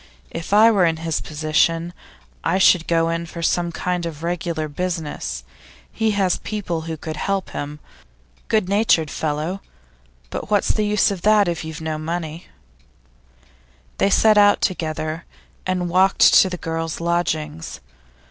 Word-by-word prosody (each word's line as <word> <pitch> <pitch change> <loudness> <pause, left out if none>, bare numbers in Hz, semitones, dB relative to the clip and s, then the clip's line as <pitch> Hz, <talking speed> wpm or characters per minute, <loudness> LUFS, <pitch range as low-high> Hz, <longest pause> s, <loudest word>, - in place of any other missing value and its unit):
If 165 +2 -6
I 220 +3 +7
were 200 -4 +3
in 165 -2 +2
his 165 -2 -1
position, 160 +2 0 0.5
I 175 +3 +1
should 180 -3 +4
go 165 -1 +2
in 165 0 -2
for 170 0 -7
some 170 +1 +1
kind 180 0 -2
of 160 -1 -8
regular 170 -2 -2
business; 150 - -4 0.5
he 220 -1 0
has 190 -3 +1
people 190 -6 -3
who 160 - -4
could 155 0 -6
help 195 +1 -2
him. 145 +1 -5 0.7
Good 215 -4 +1
natured 195 -7 +2
fellow; 155 +5 -2 0.7
but - - -5
what's 205 -2 +2
the 215 -1 +1
use 210 0 +2
of 190 -3 -5
that 210 0 +4
if 170 -2 -2
you've 160 +1 -7
no 155 -1 -3
money?' 165 +1 -5 1.5
They - - +3
set 215 +1 +5
out 205 0 +5
together, 160 -2 -2 0.4
and 180 -1 -1
walked 185 +3 +4
to 190 - +6
the 180 - -4
girls' 165 -1 -4
lodgings. 160 - -2
170 Hz, 150 wpm, -21 LUFS, 160-190 Hz, 1.5 s, I